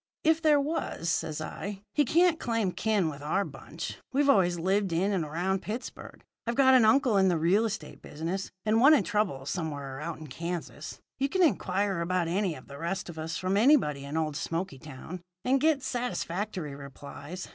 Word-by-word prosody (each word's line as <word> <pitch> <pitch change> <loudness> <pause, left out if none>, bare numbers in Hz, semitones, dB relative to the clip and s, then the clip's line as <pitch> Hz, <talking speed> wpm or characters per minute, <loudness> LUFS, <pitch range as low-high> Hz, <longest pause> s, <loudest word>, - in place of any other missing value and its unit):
"'If 320 0 +3
there 305 -3 +5
was,' 280 - -2
says 155 -1 -1
I, 200 +5 -6
'he 295 - +3
can't 335 +4 +3
claim 230 -7 0
kin 210 -3 +1
with 145 -2 -5
our 190 +7 0
bunch. - - -7
We've 280 +1 +4
always 180 -6 +3
lived 190 +2 +1
in 185 +5 +1
and 185 -4 0
around 175 +5 -1
Pittsburgh. 225 +4 -7 0.2
I've 235 - 0
got 265 0 +6
an 250 -4 +6
uncle 235 -1 +4
in 190 -1 +5
the 175 -2 +2
real 180 +8 +3
estate 215 -1 -5
business, 170 +6 -4 0.2
and 220 +1 +3
one 295 +4 +8
in 260 - +2
trouble 175 -8 -1
somewhere 140 -3 -4
out 165 +1 -4
in 155 - -9
Kansas. 170 +4 -6 0.2
You 275 +1 +1
can 375 +4 +2
inquire 195 - +1
about 175 0 0
any 185 0 0
of 130 - -13
the 140 0 -10
rest 170 +3 -3
of 160 -2 -8
us 160 +2 -3
from 185 +1 0
anybody 205 - +4
in 140 +3 -4
old 155 -2 -1
Smoky 165 -1 -3
Town, 155 +6 -9 0.2
and 260 +1 +3
get 305 -3 +3
satisfactory 205 - -3
replies. 145 +5 -9
190 Hz, 190 wpm, -29 LUFS, 160-230 Hz, 0.2 s, one